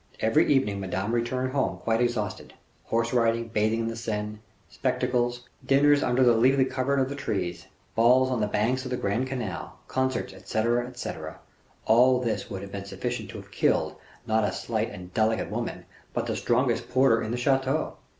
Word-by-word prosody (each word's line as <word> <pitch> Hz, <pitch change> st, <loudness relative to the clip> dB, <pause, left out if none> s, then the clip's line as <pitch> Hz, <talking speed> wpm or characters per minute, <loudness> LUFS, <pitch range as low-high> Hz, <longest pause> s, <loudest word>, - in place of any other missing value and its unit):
Every 110 Hz, +5 st, +3 dB
evening 120 Hz, -8 st, +2 dB
Madame 95 Hz, +3 st, -2 dB
returned 125 Hz, +2 st, -1 dB
home 135 Hz, 0 st, 0 dB
quite 115 Hz, +1 st, 0 dB
exhausted. 110 Hz, -5 st, -2 dB, 0.3 s
Horse 115 Hz, +1 st, 0 dB
riding, 115 Hz, -1 st, +2 dB
bathing 110 Hz, +1 st, +1 dB
in 115 Hz, -, -2 dB
the 115 Hz, -, -3 dB
Seine, 105 Hz, -2 st, -4 dB, 0.3 s
spectacles, 120 Hz, 0 st, -1 dB, 0.2 s
dinners 145 Hz, +1 st, +4 dB
under 125 Hz, +1 st, +2 dB
the 120 Hz, -1 st, +6 dB
leafy 130 Hz, +4 st, +4 dB
covert 135 Hz, +1 st, 0 dB
of 130 Hz, -, +2 dB
the 140 Hz, -, -4 dB
trees, 95 Hz, -10 st, -3 dB, 0.3 s
balls 125 Hz, +3 st, +4 dB
on 125 Hz, -3 st, 0 dB
the 105 Hz, -, +1 dB
banks 115 Hz, +5 st, 0 dB
of 130 Hz, -, -5 dB
the 125 Hz, -, -1 dB
grand 115 Hz, +6 st, -1 dB
canal, 120 Hz, -9 st, -5 dB
concerts, 130 Hz, -5 st, -1 dB
etc., 115 Hz, +5 st, 0 dB
etc.; 125 Hz, 0 st, -6 dB, 0.5 s
all 125 Hz, +3 st, +5 dB
this 115 Hz, -3 st, -2 dB
would 95 Hz, -3 st, -5 dB
have 100 Hz, -, -9 dB
been 100 Hz, 0 st, -6 dB
sufficient 115 Hz, +1 st, -4 dB
to -, -, -7 dB
have 100 Hz, 0 st, -12 dB
killed, -, -, +1 dB, 0.3 s
not 110 Hz, 0 st, +2 dB
a -, -, +1 dB
slight -, -, -2 dB
and 90 Hz, 0 st, -10 dB
delicate 110 Hz, 0 st, +1 dB
woman, -, -, -4 dB, 0.3 s
but -, -, 0 dB
the -, -, -2 dB
strongest 120 Hz, 0 st, +1 dB
porter 130 Hz, -2 st, +4 dB
in 110 Hz, -, -3 dB
the 120 Hz, -, -1 dB
chateau. 135 Hz, +3 st, 0 dB
120 Hz, 180 wpm, -27 LUFS, 110-130 Hz, 0.5 s, the